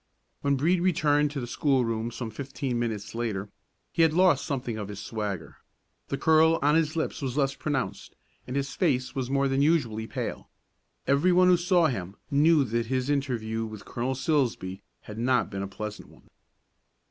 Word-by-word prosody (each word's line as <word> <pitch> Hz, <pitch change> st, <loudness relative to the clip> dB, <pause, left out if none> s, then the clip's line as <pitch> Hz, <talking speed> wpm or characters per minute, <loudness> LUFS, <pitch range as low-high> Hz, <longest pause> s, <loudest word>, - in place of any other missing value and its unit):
When 140 Hz, 0 st, +2 dB
Brede 170 Hz, +6 st, +2 dB
returned 150 Hz, -5 st, +2 dB
to 145 Hz, -1 st, -4 dB
the 120 Hz, -, -4 dB
schoolroom 120 Hz, -4 st, 0 dB
some 120 Hz, -1 st, -6 dB
fifteen 130 Hz, 0 st, -3 dB
minutes 110 Hz, -4 st, -3 dB
later, 105 Hz, -4 st, -3 dB, 0.4 s
he -, -, +1 dB
had 160 Hz, -1 st, +5 dB
lost 180 Hz, +1 st, +3 dB
something 125 Hz, -6 st, -2 dB
of 105 Hz, -, -4 dB
his 100 Hz, -1 st, -7 dB
swagger; 105 Hz, -6 st, -5 dB, 0.5 s
the 140 Hz, -, -2 dB
curl 160 Hz, +2 st, +4 dB
on 145 Hz, +1 st, +4 dB
his 160 Hz, 0 st, +2 dB
lips 160 Hz, -, -2 dB
was 135 Hz, -1 st, -3 dB
less 135 Hz, -2 st, +2 dB
pronounced, 140 Hz, -4 st, -3 dB, 0.3 s
and 125 Hz, -, -5 dB
his 140 Hz, 0 st, -2 dB
face 130 Hz, -8 st, 0 dB
was 130 Hz, -2 st, -3 dB
more 140 Hz, 0 st, +2 dB
than 135 Hz, +1 st, +1 dB
usually 120 Hz, -8 st, +1 dB
pale. -, -, -5 dB, 0.6 s
Every 140 Hz, +7 st, +3 dB
one 180 Hz, +1 st, +5 dB
who 180 Hz, -, +7 dB
saw 175 Hz, 0 st, +3 dB
him 100 Hz, -, -2 dB, 0.2 s
knew 150 Hz, +1 st, +5 dB
that 115 Hz, -1 st, -1 dB
his 130 Hz, +2 st, 0 dB
interview 115 Hz, -6 st, -1 dB
with 110 Hz, -2 st, -9 dB
Colonel 125 Hz, +2 st, -2 dB
Silsbee 125 Hz, -, -1 dB, 0.2 s
had 105 Hz, +1 st, -9 dB
not 120 Hz, -3 st, +1 dB
been 95 Hz, -1 st, -4 dB
a 100 Hz, -, -3 dB
pleasant 105 Hz, +2 st, -7 dB
one. -, -, -20 dB
135 Hz, 180 wpm, -27 LUFS, 115-150 Hz, 0.6 s, who